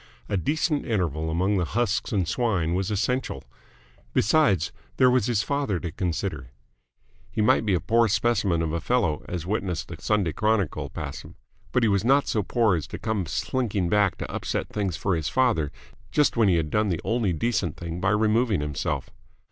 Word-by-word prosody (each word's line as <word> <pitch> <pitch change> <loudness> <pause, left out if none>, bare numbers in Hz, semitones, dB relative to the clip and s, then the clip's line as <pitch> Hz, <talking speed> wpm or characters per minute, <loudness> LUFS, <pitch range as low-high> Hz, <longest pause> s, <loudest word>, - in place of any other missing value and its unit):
A 105 - -1
decent 150 - 0
interval 80 - -1
among 95 +5 +1
the 90 - +1
husks 110 +4 -1
and 95 -5 0
swine 90 -5 0
was 95 +2 -1
essential. 125 +5 -1 0.7
Besides, 105 - +3 0.3
there 125 -1 +5
was 125 -4 +2
his 115 -3 +1
father 140 -10 -1
to 85 -2 -5
consider. 85 -6 -3 0.8
He - - -6
might 110 +1 +3
be 100 - +3
a - - +1
poor 115 +6 +3
specimen 100 -4 +1
of 80 -1 -2
a 85 - -1
fellow, 95 -6 0
as 85 -2 -4
witness 95 -3 -2
the - - -9
Sunday 100 -7 0
Chronicle 105 -6 0
passim, - - -7 0.4
but 125 - +2
he - - +4
was 100 -1 +2
not 135 +4 +3
so 110 - +1
poor 110 0 +2
as 80 - -3
to - - -6
come 110 -6 -2
slinking 105 - -1
back 105 0 +2
to - - -5
upset - - -3
things 95 -5 -2
for 95 -2 0
his 80 -3 -2
father 115 - +1 0.4
just 150 -2 +3
when 115 -3 +4
he 90 - +4
had 80 -2 -1
done 105 -1 +2
the 85 - -1
only 115 -4 +1
decent 95 -2 -1
thing 85 0 -5
by 95 - +2
removing 110 0 +2
himself. 70 -3 -3
100 Hz, 190 wpm, -25 LUFS, 85-115 Hz, 0.8 s, there